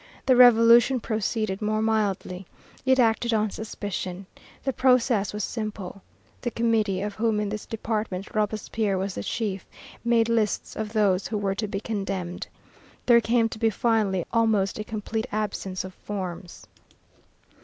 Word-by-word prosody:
The 260 - +5
Revolution 240 +1 +7
proceeded 215 -2 -2
more 215 0 0
mildly. 200 -4 -1 0.4
It 260 0 +5
acted 230 0 +2
on 215 -1 +1
suspicion. 195 -3 -5 0.4
The 270 - -1
process 250 -5 +3
was 210 0 -4
simple. 205 -4 -5 0.4
The 240 - -1
Committee, 220 -5 +1
of 205 0 -3
whom 220 0 0
in 210 -1 -1
this 210 +1 -5
department 215 -4 -3
Robespierre 215 -1 -1
was 190 +1 -2
the - - -4
chief, 200 - -3 0.4
made 235 -1 +3
lists 225 -3 0
of 220 0 -4
those 200 -4 +2
who 215 - -2
were 200 -1 0
to 210 +2 -3
be 195 -1 -3
condemned. 195 -5 -4 0.6
There 235 -1 +6
came 230 0 +2
to 220 - -8
be 225 -1 +3
finally 210 -5 +1
almost 220 -4 +2
a - - -2
complete 220 +2 -4
absence 200 -3 -3
of 185 0 -8
forms. 185 -3 -6
215 Hz, 150 wpm, -25 LUFS, 195-230 Hz, 0.6 s, Revolution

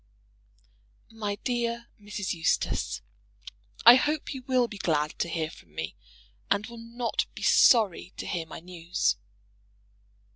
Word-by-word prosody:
MY 210 -2 -3
DEAR 235 -1 -1
MRS. 205 -1 -3
EUSTACE, 165 -2 0 0.8
I 235 - +12
hope 300 +2 -1
you 265 - -6
will 255 -2 +3
be 210 -3 -9
glad 150 -3 +1
to 170 - 0
hear 160 -1 -2
from 75 -3 -17
me, 80 +5 -4 0.5
and 200 +1 +2
will 235 0 -10
not 235 +1 -2
be - - -7
sorry 210 -7 +5
to - - -5
hear 170 -3 -3
my 160 - -9
news. 165 - -1
205 Hz, 135 wpm, -28 LUFS, 165-235 Hz, 0.8 s, I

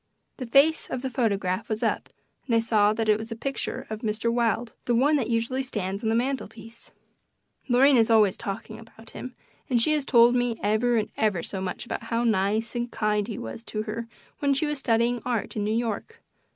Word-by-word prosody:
The 255 - -5
face 285 +6 +4
of 255 0 -4
the 265 - -3
photograph 200 -6 -1
was 215 0 -2
up - - -1 0.4
and 235 - +2
I - - +5
saw 215 -2 +3
that 220 +1 -1
it 215 0 +4
was 220 +1 -7
a - - -3
picture 270 +4 -4
of 215 - -4
Mr. 220 +1 -1
Wilde 235 -1 0
the 240 - +2
one 285 +6 +4
that 240 -4 -2
usually 235 +3 0
stands 200 -6 -3
on 220 - 0
the 225 - +2
mantel 260 +3 -1
piece. 230 +1 -12 0.8
Lorraine 260 +2 +5
is 225 -1 +4
always 215 -4 +5
talking 210 +2 -6
about 225 0 -15
him, 255 0 -8 0.3
and 245 -2 +3
she 305 +7 +3
has 300 -2 +1
told 240 -2 +5
me 245 -2 0
ever 220 +4 +2
and 215 - -1
ever 200 -6 +1
so 190 - -5
much 185 +4 -4
about 235 - -5
how 230 +1 -1
nice 215 0 +1
and 240 0 -2
kind 210 -1 0
he 225 - -5
was 115 - -7
to 215 0 -3
her 230 +1 -5 0.3
when 280 -1 +2
she 280 - +1
was 295 -1 -2
studying 235 -1 +1
art 240 -4 -2
in 210 - -1
New 210 - -1
York. 235 - -3
230 Hz, 215 wpm, -26 LUFS, 215-245 Hz, 0.8 s, I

